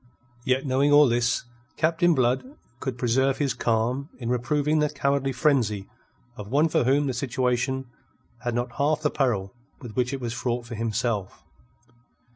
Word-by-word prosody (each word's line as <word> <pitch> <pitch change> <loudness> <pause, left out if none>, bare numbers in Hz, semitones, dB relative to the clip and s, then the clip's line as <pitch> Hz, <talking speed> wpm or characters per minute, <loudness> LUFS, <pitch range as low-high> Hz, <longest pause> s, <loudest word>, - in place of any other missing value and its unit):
Yet, 130 +1 +1
knowing 135 +2 +2
all 145 0 +7
this, 120 0 +1 0.3
Captain 165 +2 +3
Blood 125 -1 +2 0.4
could 130 -3 -4
preserve 130 +3 +1
his 140 -4 0
calm 120 +6 0
in 120 -2 -5
reproving 145 +5 +1
the 150 0 +2
cowardly 140 -2 0
frenzy 120 -8 +1 0.5
of 105 -3 -8
one 145 +8 +2
for 125 - +1
whom 140 +3 +3
the 135 - -1
situation 130 +1 -1 0.6
had 120 -2 -2
not 120 +1 -3
half 150 +2 +1
the 150 - +2
peril 105 -9 0 0.3
with 120 -5 -10
which 125 0 0
it 135 - -3
was 120 -2 -4
fraught 120 0 -2
for 120 - -8
himself. 115 -2 -2
130 Hz, 160 wpm, -25 LUFS, 120-140 Hz, 0.6 s, all